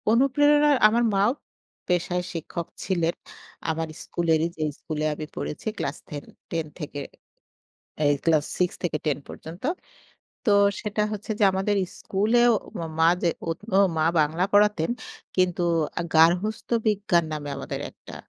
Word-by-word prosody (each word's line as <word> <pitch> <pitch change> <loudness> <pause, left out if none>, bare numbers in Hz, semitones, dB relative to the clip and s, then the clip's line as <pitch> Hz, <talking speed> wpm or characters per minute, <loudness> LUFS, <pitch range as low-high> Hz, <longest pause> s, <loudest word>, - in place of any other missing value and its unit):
অনুপ্রেরণার 290 +4 +4
আমার 230 +3 +2
মাও 200 +4 +4 0.6
পেশায় 180 0 0
শিক্ষক 170 +1 -5 0.2
ছিলেন। 170 -3 +1 0.6
আমার 160 0 -1 0.2
স্কুলেরই 165 -1 +1
যেই 155 -1 0
স্কুলে 155 -1 -3
আমি 155 +1 -6
পড়েছি 150 - -5
ক্লাস 140 - -3 0.5
10 165 -1 -2
থেকে। 150 -2 -5 1.1
এই 145 - +5
ক্লাস 160 -3 +4
6 180 -1 +2
থেকে 165 -3 0
10 150 -2 +1
পর্যন্ত। 165 +3 -10 0.8
তো, 220 - +3 0.3
সেটা 210 -1 -1
হচ্ছে 210 +2 -6
যে, 210 - +4
আমাদের 195 +2 0 0.2
স্কুলেও, 235 +5 +3
ও - - -14 0.3
মা 160 0 +6
যে, 170 - +3 0.2
ওৎ 165 - -2 0.2
ও - - +6 0.2
মা 155 - +3 0.2
বাংলা 155 +4 +1
পড়াতেন। 205 -4 +4 0.5
কিন্তু 180 -1 +2 0.5
গার্হস্থ্য 175 +9 +3
বিজ্ঞান 205 -5 +2
নামে 150 -1 -4
আমাদের 135 - -5
একটা - - -13
175 Hz, 135 wpm, -25 LUFS, 160-210 Hz, 1.1 s, মা